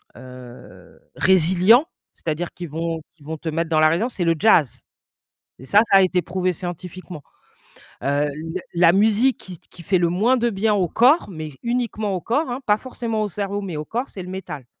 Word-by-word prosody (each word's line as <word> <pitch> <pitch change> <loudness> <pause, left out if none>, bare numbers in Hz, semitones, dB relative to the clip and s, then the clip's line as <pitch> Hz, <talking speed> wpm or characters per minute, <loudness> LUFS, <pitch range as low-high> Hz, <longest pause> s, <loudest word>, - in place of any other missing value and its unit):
heu? 125 -1 -13 0.2
Résilients, 190 - +4 0.3
c'est 165 - -6
à 155 - 0
dire 175 +2 -5
qu'ils 175 -3 -8
vont 165 +1 -3
qu'ils 150 - -20
vont 160 +1 -5
te 160 - -5
mettre 165 +1 -2
dans 155 -1 +2
la 155 - +6
résilience, 220 +10 -1
c'est 180 - -2
le 165 0 +2
jazz. 220 - +3 0.8
Et - - -11
ça 205 - +5
ça 195 - +6
a - - +5
été 180 -1 +1
prouvé 185 +1 -1
scientifiquement. 180 -1 -8 0.8
Heu, 145 +1 +1
l 165 +5 -6 0.2
la 170 -1 +6
musique 220 +6 +2
qui 180 -3 -10
qui 170 - -16
fait 185 +3 +1
le 175 -1 +1
moins 225 +9 +2
de 235 0 0
bien 210 +2 +1
au 185 -3 +1
corps, 255 - +3
mais 155 -2 -6
uniquement 235 -4 -2
au 180 - -3
corps 260 +3 -1
hein, 250 - -3
pas 210 0 +4
forcément 230 -3 -4
au 205 - -3
cerveau, 200 +1 -3
mais 180 -6 -5
au 150 - -5
corps, 245 +4 -3
c'est 190 - -8
le 180 - -9
métal. 150 -9 -7
185 Hz, 210 wpm, -21 LUFS, 165-215 Hz, 0.8 s, la